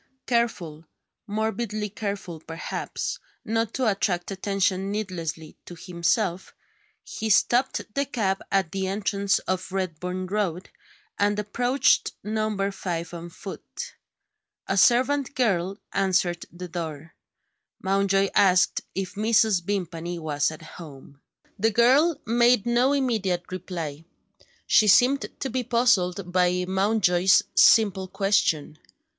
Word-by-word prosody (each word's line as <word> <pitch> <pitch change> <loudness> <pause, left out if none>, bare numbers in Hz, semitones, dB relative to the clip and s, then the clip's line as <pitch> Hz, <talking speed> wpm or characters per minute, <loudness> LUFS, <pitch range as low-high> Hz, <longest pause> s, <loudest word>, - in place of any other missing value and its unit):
Careful 180 -10 -1 0.4
morbidly 215 0 -2
careful, 200 -5 -5
perhaps 165 +1 -5 0.3
not 225 0 0
to 260 - 0
attract 195 -4 0
attention 195 0 -1
needlessly 170 -6 -5
to 175 - -10
himself, 180 +2 -1 0.5
he 220 - -5
stopped 245 +5 +2
the 280 0 -1
cab 195 -7 -1
at 190 -4 +1
the 190 -1 -2
entrance 200 0 0
to 185 0 +1
Redburn 185 0 -3
Road, 190 -2 -2 0.5
and 205 0 +2
approached 245 +6 +1
Number 215 -2 -1
Five 170 -3 -4
on 170 0 -7
foot. 190 +3 -8 0.7
A 195 - -1
servant 255 +7 +3
girl 195 -6 0 0.2
answered 185 -3 0
the 180 +2 -8
door. 160 -2 -6 0.7
Mountjoy 195 0 +2
asked 185 -2 +4
if 190 -1 -3
Mrs. 215 -2 +2
Vimpany 175 -3 -3
was 150 -3 0
at 160 +1 -10
home. 145 -4 -12 0.4
The 220 +3 +3
girl 265 +9 +4
made 235 -1 +3
no 240 +3 +3
immediate 215 -11 -1
reply. 165 -4 -6 0.6
She 215 - +4
seemed 255 +7 +4
to 270 - -3
be 255 +1 -1
puzzled 200 -7 +1
by 180 0 +2
Mountjoy's 190 -2 +3
simple 200 -4 +5
question. 190 -6 0
195 Hz, 115 wpm, -25 LUFS, 175-220 Hz, 0.7 s, simple